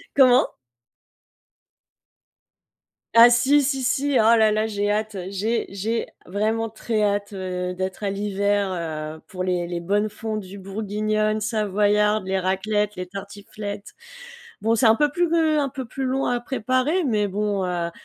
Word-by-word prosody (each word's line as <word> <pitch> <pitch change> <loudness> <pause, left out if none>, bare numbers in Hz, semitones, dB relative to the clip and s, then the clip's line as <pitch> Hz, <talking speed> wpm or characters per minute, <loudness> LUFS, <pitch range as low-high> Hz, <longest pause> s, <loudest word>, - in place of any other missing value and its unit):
Comment? 255 -2 +6 2.7
Ah 235 +1 +10
si, 270 +4 +4
si, 270 -1 -1
si, 280 +3 +1
oh 225 +2 +6
là 220 -1 +4
là, 215 +1 +1
j'ai 205 -2 -1
hâte, 215 -1 -1
j'ai 215 +4 -1
j'ai 215 +4 -2 0.2
vraiment 220 +4 -1
très 220 0 -2
hâte, 205 0 0
heu, 180 -1 -4
d'être 185 +2 -4
à 200 - 0
l'hiver, 200 -1 0
heu, 155 -2 -5
pour 185 -1 -5
les 180 -2 -1
les 175 -1 -3
bonnes 205 +4 0
fondues 210 -3 -6
bourguignonnes, 215 +2 -1
savoyardes, 210 -1 +1
les 190 0 0
raclettes, 205 +3 -1
les 180 0 -5
tartiflettes. 200 +2 -8 0.7
Bon, 225 +2 +2
c'est 230 0 +4
un 220 - +6
peu 295 +1 +2
plus, 350 +3 +1
heu, 315 -2 +3
un 280 -2 0
peu 265 -1 -6
plus 265 +3 -4
long 265 +1 0
à 245 0 0
préparer, 255 - 0
mais 215 -7 +1
bon, 200 0 -1
heu, 175 -2 -2
210 Hz, 155 wpm, -23 LUFS, 195-230 Hz, 2.7 s, Ah